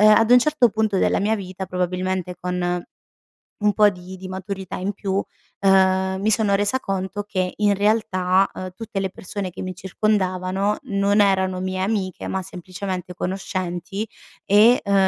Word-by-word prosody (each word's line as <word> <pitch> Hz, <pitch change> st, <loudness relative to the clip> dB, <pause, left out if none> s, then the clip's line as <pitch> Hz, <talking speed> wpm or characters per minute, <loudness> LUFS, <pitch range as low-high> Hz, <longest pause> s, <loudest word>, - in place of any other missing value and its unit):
uhm, 210 Hz, -, +7 dB
ad 225 Hz, +2 st, +5 dB
un 250 Hz, -, +9 dB
certo 275 Hz, -2 st, +3 dB
punto 215 Hz, -2 st, 0 dB
della -, -, +2 dB
mia 210 Hz, +3 st, +2 dB
vita, 190 Hz, -2 st, -6 dB
probabilmente 180 Hz, 0 st, -2 dB
con 180 Hz, -1 st, -2 dB, 0.7 s
un 210 Hz, -1 st, +2 dB
po' 210 Hz, 0 st, +5 dB
di 185 Hz, -1 st, -7 dB
di 185 Hz, -, -8 dB
maturità 190 Hz, 0 st, -5 dB
in 195 Hz, +3 st, -2 dB
più, 195 Hz, -1 st, -4 dB, 0.5 s
uhm, 190 Hz, -1 st, +3 dB
mi 215 Hz, +2 st, +2 dB
sono 210 Hz, -2 st, +2 dB
resa 205 Hz, +6 st, +1 dB
conto 195 Hz, -2 st, -3 dB
che 185 Hz, -3 st, -2 dB
in 205 Hz, -1 st, +3 dB
realtà, 195 Hz, -3 st, +2 dB
uhm, 185 Hz, -, -6 dB
tutte 220 Hz, -2 st, -4 dB
le 190 Hz, -, -1 dB
persone 195 Hz, +1 st, -5 dB
che -, -, -8 dB
mi 185 Hz, 0 st, -4 dB
circondavano 190 Hz, 0 st, 0 dB
non 200 Hz, +1 st, +2 dB
erano 190 Hz, -2 st, +2 dB
mie 185 Hz, 0 st, -2 dB
amiche, 190 Hz, -2 st, -2 dB
ma 190 Hz, 0 st, -2 dB
semplicemente 185 Hz, 0 st, -6 dB
conoscenti 185 Hz, +2 st, -3 dB, 0.4 s
e, 215 Hz, +5 st, +5 dB
uhm, 200 Hz, -1 st, +1 dB
190 Hz, 165 wpm, -22 LUFS, 185-205 Hz, 0.7 s, un